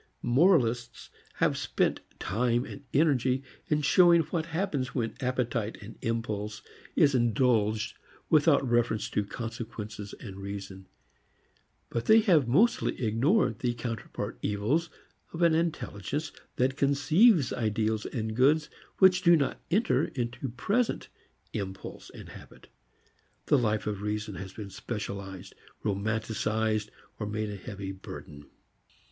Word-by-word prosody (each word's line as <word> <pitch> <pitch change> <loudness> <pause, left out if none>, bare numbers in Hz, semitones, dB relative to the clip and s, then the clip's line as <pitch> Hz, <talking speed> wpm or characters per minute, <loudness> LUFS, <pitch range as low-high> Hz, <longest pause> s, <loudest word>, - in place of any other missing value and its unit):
Moralists 125 -4 +2 0.2
have - - +2
spent - - 0 0.2
time 120 +4 0
and 140 - -9
energy 135 -3 +2 0.2
in 150 -1 +1
showing 170 +3 +6
what 165 +1 -3
happens 160 -7 -2
when 115 -4 -1
appetite, 125 -4 -1 0.2
impulse, 110 -2 -3 0.3
is 140 -2 +5
indulged 115 -3 +2 0.3
without 150 -3 +4
reference 120 -2 +1
to 105 - +1
consequences 110 -2 -6
and 100 -5 -9
reason. 95 -1 -7 1.0
But 115 - -2
they 220 +1 +7
have 170 - +4
mostly 200 - +2
ignored 130 - +2
the 120 -1 -1
counterpart 115 -3 -5
evils 110 +12 0 0.4
of 170 +1 -1
an 170 -1 +5
intelligence 150 - -2 0.2
that 130 +2 +1
conceives 145 - +4
ideals 110 -1 0
and 110 -3 -3
goods 150 +5 +3 0.3
which 185 -1 +6
do 175 -2 +6
not 140 -4 -1
enter 165 - +2
into 120 +1 -4
present 205 - -1 0.4
impulse 95 -2 -6
and - - -11
habit. - - -14 0.8
The 145 - +4
life 110 -3 0
of 105 -2 -3
reason 105 0 -3
has 95 0 -7
been 100 -3 -8
specialized, 100 -4 -6 0.3
romanticized, 110 +1 -1 0.3
or 105 - -3
made 105 0 -2
a - - -5
heavy 100 -1 -6
burden. 75 -6 -10
120 Hz, 120 wpm, -29 LUFS, 105-145 Hz, 1.0 s, they